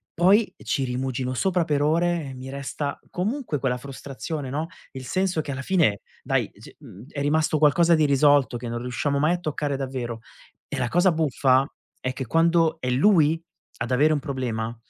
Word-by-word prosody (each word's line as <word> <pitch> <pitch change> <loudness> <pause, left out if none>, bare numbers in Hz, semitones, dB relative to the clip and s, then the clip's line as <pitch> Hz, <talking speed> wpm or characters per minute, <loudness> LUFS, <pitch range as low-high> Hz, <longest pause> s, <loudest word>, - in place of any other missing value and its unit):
Poi 195 +6 +4
ci 135 - -1
rimugino 130 0 -2
sopra 180 +6 +1
per 145 -3 0
ore 165 0 +1
e - - -7
mi 130 +1 -8
resta 140 +1 -4
comunque 215 - -2
quella 130 -2 0
frustrazione, 140 +2 -6
no, 155 +4 -2 0.2
il 130 -1 -8
senso 185 +2 0
che 145 - -6
alla 135 0 -4
fine 150 - +2 0.2
dai, - - 0
ehm, - - -27
c - - -13
mhmm, 100 +6 -13
è 145 - -5
rimasto 155 +2 +2
qualcosa 165 +3 +4
di 155 - +2
irrisolto 140 -2 +4
che 120 +1 -7
non 120 0 -3
riusciamo 125 +4 -1
mai 155 +4 +3
a 180 - -2
toccare 150 -3 -2
davvero. 130 -4 -4 0.5
E - - -5
la 125 - 0
cosa 180 +5 +4
buffa 135 -4 +2 0.3
è 130 - -3
che 130 0 -5
quando 165 +4 +3
è 130 - -2
lui 160 +3 +4 0.4
ad 115 +2 -4
avere 150 +5 +4
un 150 - 0
problema, 120 -5 -3
145 Hz, 190 wpm, -24 LUFS, 130-165 Hz, 0.5 s, Poi